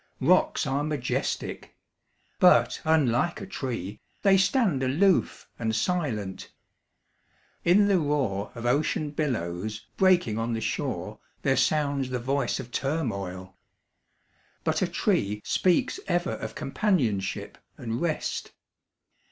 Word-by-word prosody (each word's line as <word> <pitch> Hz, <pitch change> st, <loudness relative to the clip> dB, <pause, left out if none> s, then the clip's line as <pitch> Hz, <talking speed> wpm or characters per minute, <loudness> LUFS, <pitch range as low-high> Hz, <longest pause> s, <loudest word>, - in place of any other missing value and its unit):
Rocks -, -, +3 dB
are 140 Hz, +1 st, 0 dB
majestic; 145 Hz, -4 st, -3 dB, 0.6 s
but, -, -, +5 dB
unlike 155 Hz, 0 st, +2 dB
a 195 Hz, -, -6 dB
tree, 120 Hz, -, -5 dB, 0.2 s
They 195 Hz, -2 st, +6 dB
stand 195 Hz, -, +2 dB
aloof, 165 Hz, +9 st, +2 dB
and 110 Hz, -1 st, -1 dB
silent. 115 Hz, -, -2 dB, 1.1 s
In 195 Hz, +4 st, +5 dB
the 195 Hz, -3 st, +4 dB
roar 135 Hz, -10 st, -1 dB
Of 115 Hz, 0 st, -6 dB
ocean 145 Hz, +3 st, +1 dB
billows 110 Hz, -, -3 dB
breaking 175 Hz, -, +3 dB
on 115 Hz, +1 st, -1 dB
the 115 Hz, -, -1 dB
shore -, -, -3 dB, 0.2 s
There -, -, +3 dB
sounds 140 Hz, -3 st, +1 dB
the 125 Hz, -, -1 dB
voice 130 Hz, +1 st, -1 dB
of 120 Hz, -, -8 dB
turmoil. 100 Hz, -, -3 dB, 1.1 s
But -, -, 0 dB
a -, -, +2 dB
tree 105 Hz, +1 st, 0 dB
Speaks 220 Hz, -, +2 dB
ever 175 Hz, 0 st, 0 dB
of -, -, -5 dB
companionship 135 Hz, -, -1 dB, 0.2 s
and 115 Hz, +1 st, -4 dB
rest. 165 Hz, -3 st, -2 dB
135 Hz, 115 wpm, -27 LUFS, 110-170 Hz, 1.1 s, They